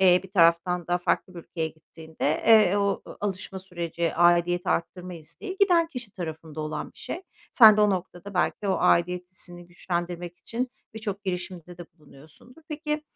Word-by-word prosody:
eee, 180 -1 +6
bir 190 - -13
taraftan 170 -1 +3
da 175 0 +1
farklı 180 +1 -1
bir - - -7
ülkeye 165 -1 -4
gittiğinde, 160 -1 -4
eee, 215 -4 +6
o, 200 -1 0 0.2
alışma 195 -1 -4
süreci, 170 -3 -3
aidiyeti 175 +1 +3
arttırma 180 +1 -2
isteği 375 - -8
giden 350 -4 +5
kişi 245 - -7
tarafında 160 -3 -6
olan 155 0 -4
bir - - -21
şey. 360 - -6 0.3
Sen 220 -4 +9
de 215 - +3
o 210 -1 +5
noktada 185 +1 -4
belki 195 +2 0
o 190 - +2
aidiyet 180 0 +2
hissini 175 -2 -5
güçlendirmek 175 0 -4
için 245 +2 -4 0.2
birçok 210 -2 -5
girişimde 180 -1 -5
de 175 - -7
bulunuyorsundur. 160 - -18
Peki, 300 0 -3
180 Hz, 165 wpm, -26 LUFS, 170-205 Hz, 0.3 s, Sen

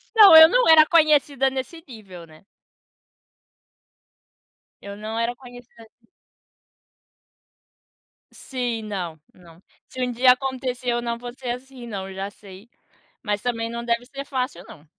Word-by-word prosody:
Não. 415 -6 +9
Eu 320 0 +11
não - - +2
era 315 -1 +8
conhecida 295 -4 +2
nesse 270 +5 -7
nível, 195 -8 -12
né. 155 +2 -20 2.4
Eu 200 0 -9
não 220 +2 -6
era 235 +1 -2
conhecida 245 -2 -15
assim. 230 +1 -26 2.2
Sim. 245 -4 -5
Não. 180 -6 -6
Não. 170 -1 -19 0.3
Se 255 - -8
um 250 - -1
dia 250 +1 +4
acontecer 255 -1 -3
eu 240 0 -1
não 235 -1 -4
vou 245 0 -9
ser 255 -1 -8
assim 250 0 -9
não. 200 -4 -6
Eu 190 - -10
já 195 +1 -5
sei. 200 +2 -16 0.5
Mas 210 -1 -2
também 230 -1 -3
não 235 0 -6
deve 235 0 -1
ser 275 +2 -9
fácil, 260 -1 -4
não. 150 - -15
240 Hz, 145 wpm, -22 LUFS, 215-265 Hz, 2.4 s, Eu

